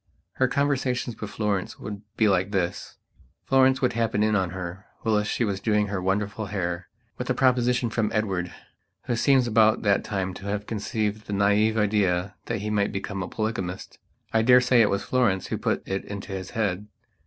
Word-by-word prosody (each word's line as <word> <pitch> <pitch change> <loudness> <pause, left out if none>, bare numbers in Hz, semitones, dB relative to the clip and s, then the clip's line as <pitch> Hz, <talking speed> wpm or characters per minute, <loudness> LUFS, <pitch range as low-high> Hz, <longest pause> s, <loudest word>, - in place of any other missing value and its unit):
Her 130 - +3
conversations 130 -4 -1
with 105 - -4
Florence 105 -4 -2
would 105 -1 -7 0.2
be 110 - +4
like 95 -1 +2
this. 95 -4 -2 0.5
Florence 135 0 +4
would 125 - +2
happen 115 -2 +1
in 110 0 +2
on 95 -3 +1
her, 95 +2 -7 0.2
whilst 105 -1 +1
she - - 0
was 100 -2 -2
doing 105 -2 +1
her 100 -2 -2
wonderful 100 +3 -1
hair, 90 -3 -3 0.3
with 125 - -4
a 130 - +2
proposition 125 -2 +2
from 110 -2 0
Edward, 95 -5 -1 0.5
who 120 - -1
seems 130 +1 +4
about 110 -1 +3
that 100 -2 +3
time 95 -2 -2
to 95 - -10
have 105 +1 -2
conceived 105 0 -3
the 105 - -4
naïve 105 +2 +3
idea 100 -3 +1
that 115 -3 -2
he 105 +1 -3
might 100 -1 +1
become 100 0 -4
a 90 - -3
polygamist. 95 -5 -4 0.3
I 110 - +4
daresay 125 +1 +5
it 105 - +4
was 100 0 -1
Florence 115 -8 +1
who - - -2
put - - -1
it 95 0 -2
into 100 -1 -7
his 95 -1 -5
head. 105 -2 -1
105 Hz, 190 wpm, -25 LUFS, 95-115 Hz, 0.5 s, daresay